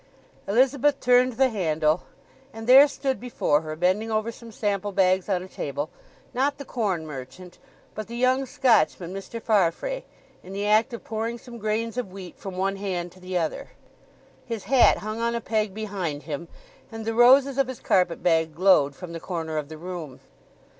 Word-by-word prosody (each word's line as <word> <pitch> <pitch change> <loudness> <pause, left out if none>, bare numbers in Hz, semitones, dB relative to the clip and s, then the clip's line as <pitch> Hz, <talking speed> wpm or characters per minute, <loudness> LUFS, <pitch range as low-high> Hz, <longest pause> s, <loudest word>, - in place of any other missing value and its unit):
Elizabeth 265 +6 +3
turned 250 0 +4
the 260 +3 +3
handle; 160 -6 +1 0.5
and 225 0 -8
there 265 +4 +9
stood 275 -2 -2
before 195 -11 +1
her, 155 -1 -6
bending 185 +7 +1
over 220 +1 -1
some 230 0 -12
sample 205 -1 -2
bags 190 0 +2
on 185 -2 0
a - - -9
table, 145 -2 -4 0.4
not 280 +3 0
the 280 - -8
corn 195 -11 -2
merchant, 150 +5 -9 0.3
but 215 -1 -6
the 235 - -7
young 255 +2 +2
Scotchman 185 -8 +2
Mr. 195 +4 -6
Farfrae—in 215 - -2
the 200 +1 -2
act 215 +4 +3
of 235 - -7
pouring 225 +2 -3
some 235 0 -11
grains 220 +2 -2
of 200 -7 -5
wheat 185 -2 -10
from 190 -2 -7
one 195 +1 0
hand 180 -3 -3
to 185 - -18
the 185 0 -3
other. 165 -3 -3 0.7
His 230 -4 -5
hat 260 -3 +5
hung 215 +2 -5
on 235 0 0
a - - 0
peg 215 -2 -1
behind 190 -8 -4
him, 160 +2 -5 0.4
and 225 -1 -7
the 225 - -1
roses 265 +3 +5
of 270 - +3
his 260 -2 -7
carpet 180 -3 +1
bag 160 -2 +2
glowed 160 -6 +4
from 175 +1 -9
the 165 - -5
corner 160 -3 -3
of 145 -1 -7
the 155 - -8
room. 170 -5 -7
205 Hz, 180 wpm, -25 LUFS, 175-235 Hz, 0.7 s, there